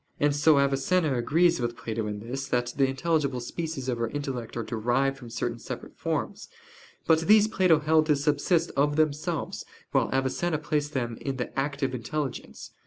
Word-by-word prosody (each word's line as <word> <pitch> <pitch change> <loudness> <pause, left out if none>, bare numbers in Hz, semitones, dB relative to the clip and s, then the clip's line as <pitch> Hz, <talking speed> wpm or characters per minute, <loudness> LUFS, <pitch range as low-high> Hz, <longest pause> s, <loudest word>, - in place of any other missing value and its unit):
And 145 0 +2
so 150 0 +5
Avicenna 140 +3 +2
agrees 165 +8 +3
with 120 0 -2
Plato 110 -1 -3
in 105 -1 -5
this, 135 +5 -5
that 120 0 -1
the 135 -1 +3
intelligible 140 -1 0
species 150 +1 -5
of 120 -2 -1
our 115 - 0
intellect 130 -4 -5
are 115 - -1
derived 125 +5 0
from 120 -3 -10
certain 115 - -3
separate - - -8
forms; - - -3 0.6
but 160 -1 +5
these 215 0 +7
Plato 185 -6 +4
held 155 +1 +3
to 150 - +4
subsist 150 +4 +1
of 145 +1 +2
themselves, 155 +1 -1 0.3
while - - +2
Avicenna 135 +5 0
placed 150 0 -2
them 120 -3 -2
in 135 -2 -3
the 125 - -5
"active 140 -1 -1
intelligence." 130 +3 -5
140 Hz, 175 wpm, -27 LUFS, 125-155 Hz, 0.6 s, these